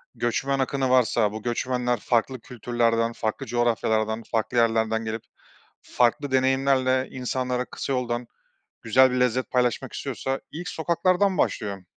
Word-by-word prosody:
göçmen 135 +3 -1
akını 135 0 0
varsa, 120 -4 +3
bu 110 0 -7
göçmenler 125 0 -1
farklı 120 +3 0
kültürlerden, 115 -1 0
farklı 110 +4 -3
coğrafyalardan, 110 -2 0
farklı 115 +2 -1
yerlerden 110 -1 +2
gelip 110 0 -4 0.6
farklı 130 +4 +1
deneyimlerle 130 0 +2
insanlara 125 0 -2
kısa 135 - -4
yoldan 120 -1 -2 0.6
güzel 130 +4 +5
bir 125 - 0
lezzet 125 +1 +1
paylaşmak 125 -2 0
istiyorsa 135 0 -3
ilk 175 +4 -6
sokaklardan 180 +3 +1
başlıyor. 100 -7 -1
125 Hz, 125 wpm, -25 LUFS, 115-130 Hz, 0.6 s, güzel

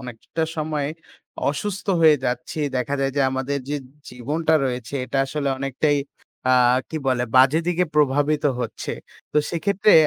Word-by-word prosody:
অনেকটা 125 +6 -5
সময় 150 -2 -1 0.6
অসুস্থ 195 +8 -4
হয়ে 155 -2 +7
যাচ্ছি। 125 +5 -3 0.2
দেখা 125 +3 -1
যায় 135 -1 0
যে, 140 - +3
আমাদের 135 +2 -2
যে 145 - -1 0.3
জীবনটা 150 +7 0
রয়েছে 125 0 -3
এটা 135 - -2
আসলে 140 0 -2
অনেকটাই 140 +2 +1 0.5
আ - - +6 0.4
কি 160 - -3
বলে 125 -1 +1
বাজে 135 +5 +6
দিকে 175 +1 +2
প্রভাবিত 145 +1 +2 0.2
হচ্ছে। 115 - -4 0.4
তো - - +4
সেক্ষেত্রে 200 +4 +2
145 Hz, 145 wpm, -23 LUFS, 130-155 Hz, 0.6 s, হয়ে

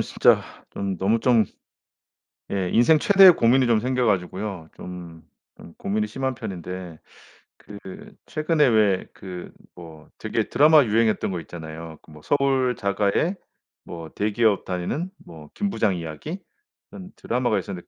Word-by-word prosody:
진짜 - - +3 0.3
좀 100 -1 -4
너무 100 +6 +1
좀 120 -3 +4 1.1
예 95 -2 -1
인생 135 +7 +5
최대의 195 +2 +7
고민이 125 +2 +4
좀 115 -2 +3
생겨 125 +2 0
가지고요. 95 -3 -2
좀, 85 -2 -10 0.4
좀 - - -14
고민이 105 +2 -2
심한 130 +5 -3
편인데 90 -6 -7 0.8
그 95 - -11
최근에 155 -1 +1
왜 105 -5 +2
그 90 -2 -9 0.2
뭐 80 -3 -13
되게 - - -2
드라마 150 +1 +6
유행했던 110 -2 +1
거 90 - -3
있잖아요. 80 -1 -9
그 - - -18
뭐 75 0 -14
서울 135 -3 +1
자가의 100 - 0 0.5
뭐 85 -2 -9
대기업 105 +1 +1
다니는 95 - -3 0.2
뭐 80 -3 -13
김부장 155 - 0
이야기? 85 - -6 0.5
이런 185 -1 -10
드라마가 120 -2 -1
있었는데 90 -2 -6
105 Hz, 280 characters per minute, -23 LUFS, 90-125 Hz, 1.1 s, 최대의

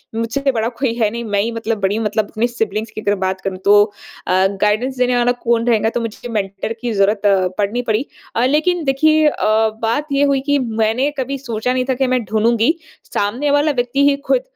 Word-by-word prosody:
मुझसे 230 +5 0
बड़ा 225 -2 -1
कोई 255 -5 +1
है 225 -3 +1
नहीं, 235 +2 -5
मैं 205 -3 0
ही 230 +3 -1
मतलब 230 -1 -3
बड़ी 200 +3 +1
मतलब 215 -1 -1
अपने 225 +2 0
सिबलिंग्स 220 -2 -3
की 215 - -7
अगर 205 -1 +1
बात 190 0 -3
करूँ 190 -1 -4
तो 205 +1 +7 0.4
अ, 185 +1 +3
गाइडेंस 230 +6 +1
देने 250 0 +2
वाला 245 0 +3
कौन 230 0 +1
रहेगा, 225 -2 +3
तो 240 - -3
मुझे 230 +1 -6
मेंटर 200 0 -3
की 240 -2 -2
जरूरत 200 +1 +2 0.4
पड़नी 210 +4 0
पड़ी। 220 +6 0 0.3
अ, 235 - +2
लेकिन 315 +6 +1
देखिए 310 +3 +3
अ, 295 - -1 0.4
बात 235 +7 0
ये 280 +1 +2
हुई 280 -2 +2
कि 285 +1 +1
मैंने 225 +2 0
कभी 275 +1 -2
सोचा 250 -2 -2
नहीं 255 0 0
था - - +3
कि 265 +1 0
मैं 255 -1 +1
ढूँढूँगी, 225 +6 +2 0.4
सामने 245 +9 0
वाला 290 +2 +3
व्यक्ति 275 +2 +1
ही 280 - +2
ख़ुद - - +3
235 Hz, 210 wpm, -18 LUFS, 215-265 Hz, 0.4 s, तो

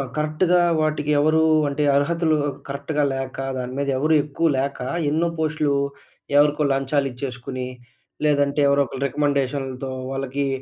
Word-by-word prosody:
కరెక్ట్‌గా 155 +4 +2 0.2
వాటికి 150 -1 0
ఎవరూ 155 +2 +3 0.3
అంటే 145 +1 -1
అరహతులు 160 +2 +2 0.3
కరెక్ట్‌గా 145 +2 -2
లేక, 135 -1 -4 0.2
దాని 125 0 -4
మీద 140 0 -1
ఎవరు 155 +4 +2
ఎక్కువ 155 +3 -1
లేక, 140 +1 -2 0.3
ఎన్నో 165 +3 +1
పోస్టులు 155 -2 0 0.6
ఎవరికో 150 +1 +4
లంచాలిచ్చేసుకొని, 135 -2 -2 0.6
లేదంటే 145 0 +2
ఎవరో 140 0 +3
ఒక్కలు 135 +2 -5
రికమెండేషన్‌లతో 135 -2 -1 0.2
వాళ్ళకి 135 +1 -2
140 Hz, 120 wpm, -22 LUFS, 135-150 Hz, 0.6 s, ఎవరికో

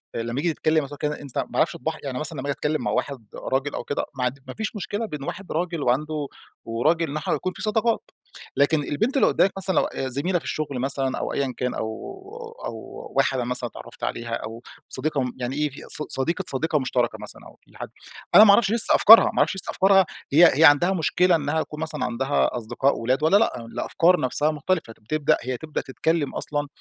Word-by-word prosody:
لما 115 +3 -3
ييجي 165 +1 0
تتكلّم 155 0 +1
مثلًا 140 - -9
أو - - -17
كده، 150 0 -3
أنت 140 -3 -9
ما - - -3
أعرفش 155 +1 +2
طباعها. 160 -1 -4
يعني 130 -3 -4
مثلًا 155 0 -3
لما 135 +2 -5
آجي - - +1
أتكلّم 150 +2 -2
مع - - -1
واحد 130 -6 -3
راجل 135 +2 -2
أو - - -4
كده، 145 - -3
ما 125 - -2
عند 125 +3 -2
ما 130 - -7
فيش 220 +1 -5
مشكلة 205 +3 -3
بين 150 -9 -7
واحد 185 +6 -7
راجل 170 -1 -2
وعنده 150 +4 -1 0.4
وراجل 155 +8 0
إن 145 - -3
إحنا 155 - -2
يكون 185 - -2
في - - -9
صداقات، 220 +1 0 0.5
لكن 145 +2 +3
البنت 220 - -1
اللي - - +4
قدّامك 195 - +3
مثلًا 190 -1 +1
لو - - +4
آآ، 135 - -4
زميلة 150 +8 0
في - - -16
الشغل 145 -4 -3
مثلًا 135 0 0
أو - - -3
أيًّا 135 -2 -1
كان 125 0 -2
أو 110 - -3 0.8
أو - - -4 0.4
واحدة 130 -2 +2
مثلًا 125 0 -1
اتعرّفت - - -12
عليها 115 0 -3
أو 115 +1 -8 0.3
صديقة 150 -2 -1
امم 125 -1 -3
يعني 125 +1 -4
إيه، 150 0 -1 0.2
ص - - -1
صديقة 170 +8 -1
صديقة 150 +3 0
مشتركة 125 -2 -1
مثلًا - - -8
أو - - -15
في - - -21
حد - - -7 0.5
أنا 215 - +11
ما 210 - +8
اعرفش 205 -1 +3
لسه 230 -1 +8
أفكارها، 225 +2 +8
ما - - -10
أعرفش - - +2
لسه 190 - -7
أفكارها، 195 0 +4 0.3
هي 170 +4 +7
هي - - +6
عندها 160 +5 +6
مشكلة 175 +2 +2
إنها 155 0 -1
تكون 150 - -10
مثلًا 155 -4 -3
عندها 125 +2 0
أصدقاء 120 +4 0
ولاد 130 +5 0
والّا 160 +6 +5
لأ؟ 125 - 0
الأفكار 175 +9 +1
نفسها 145 +4 0
مختلفة، 155 -4 -2
بتبدأ 155 +8 0
هي 125 +1 -3
تبدأ 155 +2 -4
تتكلم 155 +2 -2
أصلًا 145 -1 -2
150 Hz, 215 wpm, -24 LUFS, 130-170 Hz, 0.8 s, أنا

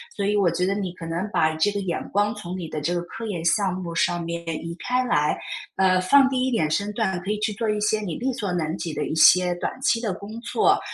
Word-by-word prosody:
所 200 - -2
以 205 +1 +1
我 200 -4 +3
觉 175 +2 0
得 195 - +1
你 195 -3 -3
可 175 -2 -9
能 170 +5 -3
把 155 -5 +2
这 160 +6 +2
个 205 - -2
眼 180 -3 -2
光 205 +2 +1
从 185 -4 -6
你 175 -3 -5
的 155 -1 -5
这 170 +4 -1
个 - - 0
科 225 +6 -8
研 175 -6 -4
项 195 +3 +2
目 180 -2 -5
上 175 +1 +1
面 170 0 -4 0.2
移 170 0 -5
开 250 +1 0
来， 150 -11 +1 0.4
呃， 185 -1 +3
放 270 +8 +6
低 260 -1 0
一 260 - +1
点 190 -11 +1
身 200 +5 0
段， 190 -5 -1
可 190 - -6
以 210 - -1
去 215 0 -1
做 220 +2 -2
一 210 0 0
些 215 +1 +1
你 180 -6 -4
力 260 +2 -1
所 210 -6 -3
能 165 -2 -1
及 165 -2 -4
的 150 0 -2
一 - - -3
些 180 +3 +6
短 175 - -4
期 230 -4 +2
的 220 -4 -1
工 215 +4 -8
作。 235 - +2
190 Hz, 290 characters per minute, -24 LUFS, 170-215 Hz, 0.4 s, 放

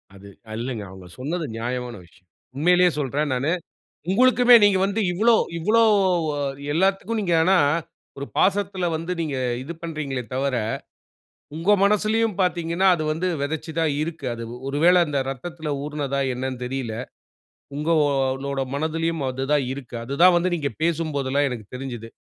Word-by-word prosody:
அது 100 +1 -13 0.3
இல்லங்க. 120 -4 -4
அவங்க 95 -1 -12
சொன்னது 160 +5 -3
நியாயமான 120 +1 -4
விஷயம். 90 +2 -25 0.3
உண்மையிலேயே 180 +4 +4
சொல்றேன் 145 +1 -1
நானு. 135 +6 0 0.6
உங்களுக்குமே 245 +2 +5
நீங்க 195 -2 +4
வந்து 200 +3 -1
இவ்ளோ 225 +6 +4 0.2
இவ்ளோ 220 +7 +3 0.9
எல்லாத்துக்கும் 195 +5 +1
நீங்க 175 -4 0
ஆனா 190 +3 +4 0.6
ஒரு 140 - -5
பாசத்துல 195 -2 +1
வந்து 165 +3 -3
நீங்க 150 -4 -2 0.2
இது 150 +6 -6
பண்றீங்களே 150 -6 -4
தவிர, 135 0 0 1.0
உங்க 165 +6 0
மனசுலயும் 215 +1 +2
பாத்தீங்கன்னா 175 +1 +1
அது 155 -2 -3
வந்து 180 +4 -1
விதைச்சு 155 +3 -3
தான் 160 -3 +2
இருக்கு. 155 -4 -5
அது 115 - -7 0.2
ஒரு 140 +1 -2
வேள 180 +1 +7
அந்த 145 -2 -1
ரத்தத்துல 155 +3 -5
ஊறுனதா 145 -2 -2
என்னன்னு 130 0 -4
தெரியல. 125 -3 -3 0.8
உங்களோட 140 -3 0
மனதிலயும் 160 +1 -1
அது 130 +1 -3
தான் 145 -3 +3
இருக்கு. 130 -3 -8
அது 135 +3 -4
தான் 180 -1 +8
வந்து 175 +1 +1
நீங்கப் 145 -7 -3
பேசும்போதுலாம் 145 -4 0
எனக்குத் 120 -2 -8
தெரிஞ்சது. 120 -4 -7
155 Hz, 140 wpm, -23 LUFS, 135-180 Hz, 1.0 s, தான்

